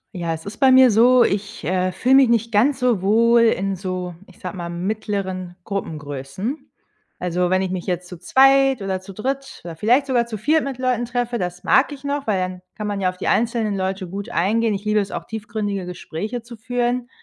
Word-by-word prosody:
Ja, 170 -2 -2
es 160 - -12
ist 200 - -7
bei 265 -2 +5
mir 260 -1 +7
so, 240 +3 +6
ich, 200 +2 -2
äh, 185 +1 0
fühle 255 +8 +1
mich 270 -2 +6
nicht 230 0 +1
ganz 245 +7 +3
so 250 -7 +1
wohl 230 +4 +4
in 195 -4 +2
so, 185 -1 -4
ich 185 - -18
sage 180 0 -6
mal, 170 -2 -5
mittleren 185 -1 -3
Gruppengrößen. 160 - -5 0.5
Also, 180 0 -1
wenn 185 +1 +2
ich 185 - -3
mich 185 0 -4
jetzt 180 -1 -2
zu 180 -2 -10
zweit 270 +3 +4
oder 190 -1 -2
zu 190 - -11
dritt 270 +7 -4
oder 170 -1 -7
vielleicht 240 - +3
sogar 245 -4 +1
zu 220 -2 -5
viert 305 +9 +2
mit 275 -2 -4
Leuten 250 -2 0
treffe, 240 0 -2
das 180 0 -4
mag 270 - +4
ich 280 -1 -9
noch, 280 0 -3
weil 210 -3 +2
dann 185 0 -4
kann 210 - -5
man 205 -1 -2
ja 185 - +2
auf 180 - -8
die 185 - -4
einzelnen 225 -2 +1
Leute 190 0 -2
gut 200 +5 -6
eingehen. 220 +3 +1
Ich 200 +2 -7
liebe 210 0 +2
es 200 -1 -2
auch, - - -5
tiefgründige 210 -4 -4
Gespräche 210 +6 -5
zu 235 0 -11
führen. 245 +1 -1
210 Hz, 215 wpm, -21 LUFS, 185-245 Hz, 0.5 s, mir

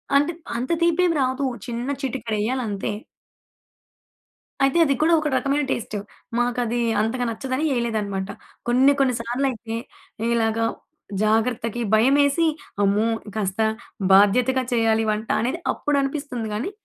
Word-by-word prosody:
అంటే, 290 +4 +4 0.3
అంత 255 +6 -3
తీపేం 340 +1 +3
రాదూ. 260 +2 0 0.2
చిన్న 240 +2 -4
చిటికెడెయ్యాలంతే. 225 -4 -2 1.7
అయితే, 275 +4 +3
అది 280 - +2
కూడా 325 +2 +4
ఒక 305 - -2
రకమైన 280 +2 +1
టేస్టు. 215 -2 -3 0.4
మాకదీ 240 -1 0 0.2
అంతగా 245 +3 -1
నచ్చదని 260 +5 -3
ఏయలేదనమాట. 210 -5 -2 0.4
కొన్ని 255 +3 +5
కొన్ని 260 -3 +3
సార్లు 245 +4 -1
అయితే, 225 -1 -6 0.5
ఈలాగా 225 -1 +1 0.6
జాగ్రత్తకి 225 +1 +1
భయమేసి, 280 +7 +4 0.4
అమ్మో! 205 +3 +2 0.3
కాస్త 200 -1 -1 0.5
బాధ్యతగా 245 +7 +4
చెయ్యాలి 225 -1 +2
వంట 215 +1 -3
అనేది, 255 +9 -1
అప్పుడనిపిస్తుంది 275 -5 -2
గానీ. 230 - -2
240 Hz, 110 wpm, -23 LUFS, 220-275 Hz, 1.7 s, కొన్ని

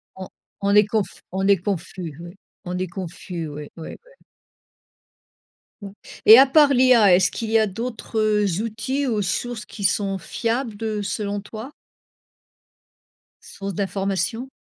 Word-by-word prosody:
On 190 -1 -8 0.3
on 200 0 +1
est 210 0 +7
conf 210 -1 -3
on 190 +1 -1
est 200 -1 +5
confus, 175 -3 -5
oui, 175 +2 -10 0.3
on 180 0 -4
est 185 +1 -2
confus, 175 -1 -6
oui, 150 0 -8
oui, 160 - -8
ouais. - - -22 1.6
Mmh, 200 - -7 0.4
et 220 - +11
à 270 - +8
part 285 0 +5
l'IA, 245 -6 +5
est-ce 185 +1 +3
qu'il 225 -1 -5
y 225 - +5
a 220 - +2
d'autres, 225 +3 -6
heu, 210 -1 +2 0.2
outils, 230 +6 -2
ou 220 -4 0
sources 210 +4 -3
qui 210 - -9
sont 195 0 +1
fiables, 230 +4 -3
heu, 215 -2 -2
selon 205 0 -3
toi? 220 +6 -9 1.7
Sources 195 0 -7
d'informations. 195 +5 -2
205 Hz, 150 wpm, -22 LUFS, 190-225 Hz, 1.7 s, et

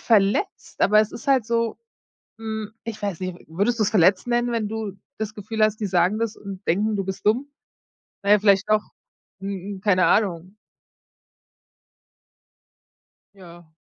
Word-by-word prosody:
verletzt, 210 - +1
aber 210 +1 +6
es 215 0 0
ist 230 - -9
halt 265 -5 +3
so 230 -1 0 0.6
hm, 220 -1 -5
ich 230 -1 -6
weiß 200 -4 -3
nicht. 185 -1 -3
W - - -19
würdest 205 +8 0
du's 210 -1 +2
verletzt 185 -1 +4
nennen, 240 0 +1
wenn 225 -3 -1
du 220 -2 -4 0.3
das 215 0 -4
Gefühl 215 +1 -3
hast, 215 0 0
die 210 - 0
sagen 185 +2 +2
das 230 -1 -2
und 195 -1 -9
denken, 210 +5 +1
du 195 - -2
bist 190 +1 -6
dumm? 250 +7 +2 0.7
Na 200 - 0
ja, 210 - +7
vielleicht 200 -1 +3
doch. 215 0 +4 0.6
Hm, 195 0 -5
keine 185 -3 +3
Ahnung. 190 -2 +1 2.8
Ja. 175 -4 -15
210 Hz, 155 wpm, -23 LUFS, 195-220 Hz, 2.8 s, ja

